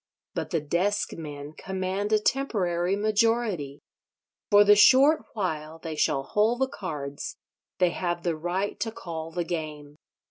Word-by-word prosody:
But - - -3
the 165 -4 0
deskmen 155 -3 -2
command 190 +2 -3
a 215 - +5
temporary 195 -7 0
majority: 210 - 0 0.7
for 205 0 +7
the 205 0 +7
short 270 +8 +6
while 160 -6 -3
they 160 -1 -6
shall 135 -2 +1
hold 220 - +1
the 265 - +3
cards 150 - -6 0.4
they 180 -2 +3
have 175 -1 -2
the 170 -2 0
right 175 +5 -2
to 225 +1 -2
call 165 -8 -6
the 175 +1 -2
game. 150 -3 -5
180 Hz, 140 wpm, -27 LUFS, 160-210 Hz, 0.7 s, for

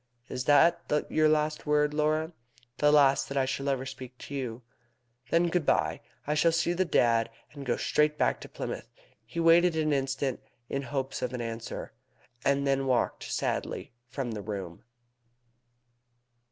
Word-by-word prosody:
"Is 125 - -4
that 150 +3 +5 0.3
your 155 0 +4
last 155 0 0
word, 150 0 +2
Laura?" 155 +2 0 0.5
"The 150 0 +5
last 140 -2 +4
that 140 - -3
I 135 - +3
shall 135 +1 -2
ever 135 -1 -1
speak 130 -1 -9
to 140 - -10
you." 125 -3 -4 0.7
"Then, 170 +3 +3
good 175 -1 +1
bye. - - +1 0.2
I 150 - 0
shall 160 +2 +3
see 165 +1 +1
the 185 +2 +1
Dad, 115 -7 +3 0.2
and 140 -3 -8
go 120 - +1
straight 150 0 +1
back - - +1
to - - -9
Plymouth." - - -6 0.3
He 115 +9 -6
waited 165 +1 +5
an 155 -1 +1
instant, 135 -1 -1 0.3
in 140 - -1
hopes 135 0 -3
of 125 0 -2
an 125 - -3
answer, 115 0 -5 0.5
and 140 0 +2
then 135 -1 +1
walked 125 -3 0
sadly - - -3 0.2
from 130 -3 -3
the 105 -2 -4
room. 95 -5 -6
140 Hz, 165 wpm, -29 LUFS, 130-155 Hz, 0.7 s, that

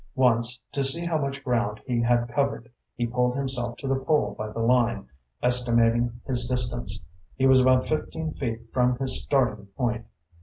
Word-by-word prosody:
Once, 125 -1 +2
to 140 - -2
see 150 +6 +2
how 165 -2 0
much 140 -1 -4
ground 120 -5 -1
he 120 -2 0
had 120 0 +2
covered, 120 -2 -2 0.2
he 120 - -1
pulled 125 +1 0
himself 130 -3 -1
to 135 - -6
the 135 0 0
pole 135 -8 +1
by 110 +1 -5
the - - -10
line, 120 - +1 0.4
estimating 120 -1 +3
his 125 -2 0
distance. 120 -5 -1 0.3
He 135 - 0
was 130 -1 +6
about 130 0 +3
fifteen 155 0 -3
feet 115 -4 -4
from 125 -1 +2
his 130 0 +1
starting 120 -7 0
point. 120 -3 -2
125 Hz, 175 wpm, -25 LUFS, 120-135 Hz, 0.4 s, was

